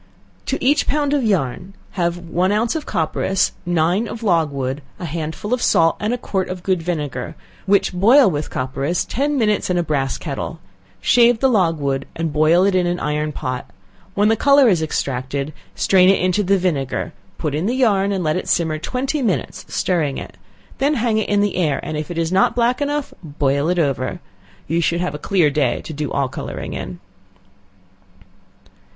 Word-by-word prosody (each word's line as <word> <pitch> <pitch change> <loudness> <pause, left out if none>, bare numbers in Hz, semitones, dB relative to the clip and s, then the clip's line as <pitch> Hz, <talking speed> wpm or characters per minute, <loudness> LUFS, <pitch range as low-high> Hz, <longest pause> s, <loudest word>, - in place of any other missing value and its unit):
To 270 - 0
each 285 +2 +3
pound 290 -1 +1
of 285 -3 +1
yarn, 185 - -1 0.2
have 175 -2 -1
one 175 +2 -1
ounce 220 +5 +1
of 315 - -4
copperas, 170 +3 0 0.2
nine 175 +6 +1
of 230 - -7
logwood, 145 -7 0 0.2
a 175 - -6
handful 160 +7 -4
of 250 - 0
salt, 165 0 +3
and 210 +2 -1
a 245 - 0
quart 190 -5 -2
of 180 -1 -6
good 185 -3 0
vinegar, 150 -7 -4 0.3
which 200 -1 +3
boil 225 +9 +6
with 150 -1 -3
copperas 135 +6 -2
ten 285 +3 -1
minutes 210 -6 +1
in 180 - +1
a 175 - +1
brass 140 -4 -1
kettle; 160 +2 -5 0.4
shave 240 - +5
the 265 - +3
logwood, 155 - +1
and 165 -2 -2
boil 155 +4 +4
it 200 - +2
in 180 -1 +2
an 175 0 -1
iron 150 0 -1
pot; 130 -3 -5 0.5
when 205 +1 +3
the 225 - +4
color 280 +3 +5
is 180 -7 +3
extracted, 140 -1 -2 0.2
strain 185 -1 +4
it 195 - +4
into 185 +3 +1
the 195 0 +2
vinegar; 150 -8 -2 0.2
put 150 - -2
in 155 +6 -1
the 245 - 0
yarn, 205 -6 +2
and 190 -2 -1
let 155 -1 +1
it 180 - -3
simmer 160 -2 +1
twenty 265 - -2
minutes 215 -8 -2
stirring 160 -7 0
it; - - -8 0.4
then 285 +3 +2
hang 225 -3 +1
it 220 - -2
in 205 0 +3
the 205 -3 0
air, 155 -6 +1
and 155 - -4
if 150 +2 -4
it 175 - -5
is 165 0 0
not 190 +1 +3
black 245 +3 +1
enough, 290 0 -2
boil 145 0 0
it 180 - +1
over. 140 -1 -1 0.5
You 165 +2 +1
should 170 +1 +1
have 180 -4 -2
a 150 - -6
clear 170 -3 +2
day 140 -4 +1
to 160 - -7
do 150 0 -4
all 140 -1 0
coloring 130 - -6
in. 85 - -6
175 Hz, 190 wpm, -20 LUFS, 150-210 Hz, 0.5 s, boil